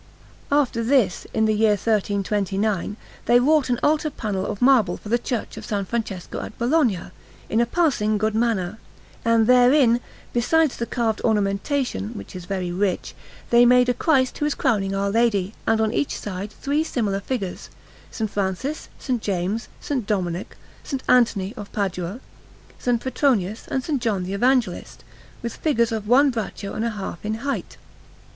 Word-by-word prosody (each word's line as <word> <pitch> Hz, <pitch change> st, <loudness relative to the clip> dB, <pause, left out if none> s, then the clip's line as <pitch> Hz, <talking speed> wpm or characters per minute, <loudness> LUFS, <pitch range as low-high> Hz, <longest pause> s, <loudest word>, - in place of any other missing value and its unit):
After 270 Hz, -5 st, +2 dB
this, 230 Hz, -7 st, +2 dB
in 220 Hz, 0 st, +2 dB
the 215 Hz, -, +3 dB
year 215 Hz, 0 st, +4 dB
1329, 205 Hz, -1 st, 0 dB, 0.3 s
they 240 Hz, -, +6 dB
wrought 290 Hz, +1 st, +3 dB
an 245 Hz, -1 st, +1 dB
altar 305 Hz, +1 st, +2 dB
panel 205 Hz, -8 st, -3 dB
of 205 Hz, -, -4 dB
marble 245 Hz, -9 st, +4 dB
for 210 Hz, -, -10 dB
the 240 Hz, +2 st, +2 dB
Church 240 Hz, -1 st, -4 dB
of -, -, -8 dB
S. 200 Hz, -2 st, 0 dB
Francesco 215 Hz, -6 st, -4 dB
at -, -, -8 dB
Bologna, 240 Hz, -, +1 dB, 0.4 s
in 225 Hz, -, +2 dB
a 235 Hz, -, +1 dB
passing 240 Hz, -9 st, +1 dB
good 215 Hz, +1 st, 0 dB
manner; 220 Hz, -3 st, 0 dB, 0.4 s
and 230 Hz, -1 st, +4 dB
therein, 250 Hz, 0 st, +5 dB, 0.3 s
besides 300 Hz, +5 st, +2 dB
the 235 Hz, -, -3 dB
carved 225 Hz, -3 st, -1 dB
ornamentation, 205 Hz, -, 0 dB
which 100 Hz, -, -9 dB
is 180 Hz, -1 st, -7 dB
very 185 Hz, -2 st, -3 dB
rich, 190 Hz, +1 st, -1 dB, 0.4 s
they 240 Hz, 0 st, +7 dB
made 250 Hz, +1 st, +5 dB
a -, -, +3 dB
Christ 265 Hz, -3 st, +1 dB
who 295 Hz, -, +1 dB
is 300 Hz, -, -1 dB
crowning 200 Hz, -7 st, +1 dB
Our 200 Hz, 0 st, 0 dB
Lady, 215 Hz, -3 st, +1 dB
and 225 Hz, 0 st, +3 dB
on 220 Hz, 0 st, +1 dB
each 290 Hz, -, -1 dB
side 200 Hz, 0 st, -5 dB
three 290 Hz, +7 st, -1 dB
similar 210 Hz, -10 st, -1 dB
figures 200 Hz, -4 st, -4 dB, 0.4 s
S. 220 Hz, -2 st, -2 dB
Francis, 200 Hz, +9 st, -3 dB, 0.2 s
S. -, -, -1 dB
James, 200 Hz, +2 st, -2 dB, 0.2 s
S. 290 Hz, -, 0 dB
Dominic, 180 Hz, -4 st, -2 dB, 0.3 s
S. 275 Hz, -, -4 dB
Anthony 225 Hz, -5 st, +3 dB
of 205 Hz, -4 st, -8 dB
Padua, 195 Hz, +2 st, -3 dB, 0.6 s
S. -, -, -1 dB
Petronius, 230 Hz, -6 st, 0 dB
and 265 Hz, -1 st, -2 dB
S. 300 Hz, -3 st, +1 dB
John 215 Hz, -6 st, 0 dB
the 185 Hz, +2 st, -4 dB
Evangelist, 200 Hz, -, 0 dB, 0.4 s
with 235 Hz, -, -4 dB
figures 235 Hz, -7 st, +1 dB
one 245 Hz, +6 st, +3 dB
braccio 215 Hz, -3 st, -4 dB
and 220 Hz, -, -2 dB
a -, -, +1 dB
half 200 Hz, -5 st, -6 dB
in 215 Hz, +1 st, -1 dB
height. 280 Hz, -, -3 dB
220 Hz, 165 wpm, -23 LUFS, 200-250 Hz, 0.6 s, they